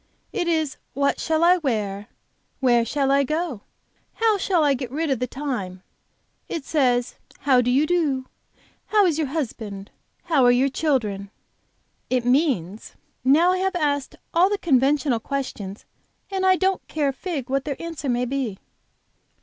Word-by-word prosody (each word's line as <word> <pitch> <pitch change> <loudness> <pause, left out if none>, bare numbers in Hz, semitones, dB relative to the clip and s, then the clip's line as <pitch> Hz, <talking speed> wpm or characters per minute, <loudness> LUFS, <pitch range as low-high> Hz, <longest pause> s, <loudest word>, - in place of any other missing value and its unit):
It 350 - -1
is 315 -5 0 0.2
what 280 0 +1
shall 320 0 +1
I 355 +2 +6
wear, 210 - -2 0.5
where 240 -3 +4
shall 270 +3 0
I 280 0 +4
go, 305 - -2 0.5
how 450 -1 +3
shall 360 -4 +2
I 285 -2 +4
get 255 -2 -4
rid 305 +3 -2
of 260 - 0
the 250 - -1
time; 220 -11 -5 0.7
it 320 -5 -4
says, 250 -5 +1 0.2
'How 260 -3 +4
do 245 - 0
you 270 +5 +3
do? 300 -6 0 0.6
how 420 -2 +4
is 325 -4 +1
your 310 - 0
husband? 220 -9 -5 0.3
How 310 -7 +2
are 245 - +6
your 255 +3 +3
children? 225 -10 -1 0.4
' - - -45
it 240 - -9
means, 245 - 0 0.3
'Now 310 +7 +5
I 370 - +1
have 380 0 0
asked 285 -4 -1 0.2
all 355 +3 +5
the 410 - 0
conventional 280 - +2
questions, 220 -6 -5 0.5
and 380 -1 0
I 375 - +6
don't 380 0 0
care 295 -3 0
a - - -3
fig 290 -4 -4
what 275 0 -1
their 285 -3 -4
answer 330 -4 -5
may 245 0 +1
be.'" 250 -6 -2
275 Hz, 165 wpm, -23 LUFS, 245-325 Hz, 0.7 s, I